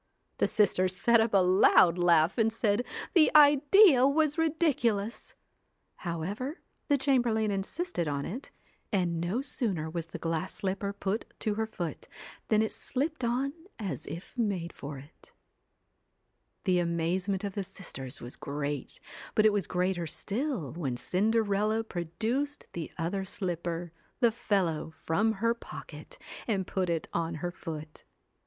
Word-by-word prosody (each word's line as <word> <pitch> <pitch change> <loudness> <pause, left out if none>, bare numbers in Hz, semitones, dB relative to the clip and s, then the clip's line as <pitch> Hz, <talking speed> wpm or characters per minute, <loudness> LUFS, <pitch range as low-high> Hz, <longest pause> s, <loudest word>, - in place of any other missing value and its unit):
The - - +4
sisters 185 -3 +2
set 235 +4 +4
up 225 0 +1
a 195 -2 +5
loud 180 -1 +6
laugh, 170 +3 +4
and 225 0 +4
said 220 0 +1 0.3
the 325 -4 +6
idea 295 - +7
was 300 +1 +2
ridiculous! 270 -10 0 0.6
However, 195 - -4 0.3
the 285 - +4
chamber 260 -3 +2
lain 220 -1 +1
insisted 200 - -2
on 140 -1 -2
it, 245 +9 -6 0.4
and 175 -5 0
no 185 +9 0
sooner 195 - -2
was 165 -1 -4
the - - -7
glass 165 +2 -2
CINDER - - -4
slipper 200 +1 -2
put 200 +2 -2 0.2
to 215 - 0
her 220 +1 -1
foot, 175 -6 -5 0.4
than 215 0 +4
it 220 - -2
slipped 285 +2 -2
on 255 +4 0 0.2
as 195 -7 -5
if 170 - -7
ELLA 230 - +3
made 175 -4 -3
for 140 0 -7
it 140 +4 -15 1.3
The 185 -2 +3
amazement 175 +3 0
of 200 -1 -3
the 200 - -2
sisters 135 -8 -6
was 120 - -9
great, 145 -1 -3 0.4
but 215 - +4
it 215 - +6
was 205 -3 0
greater 180 -1 0
still 215 - -2
when 140 -7 -3
Cinderella 215 - +1
produced 225 - -2
the 165 -3 -5
other 180 +4 -1
slipper 175 -2 -3 0.3
the 235 -2 +5
fellow 195 -9 0
from 195 +7 0
her 230 +3 +1
pocket, 485 - -9 0.3
and 195 -5 0
put 185 -1 -1
it 165 -2 -1
on 165 -1 -1
her 175 +3 -3
foot. 155 -3 -8
195 Hz, 150 wpm, -30 LUFS, 170-235 Hz, 1.3 s, idea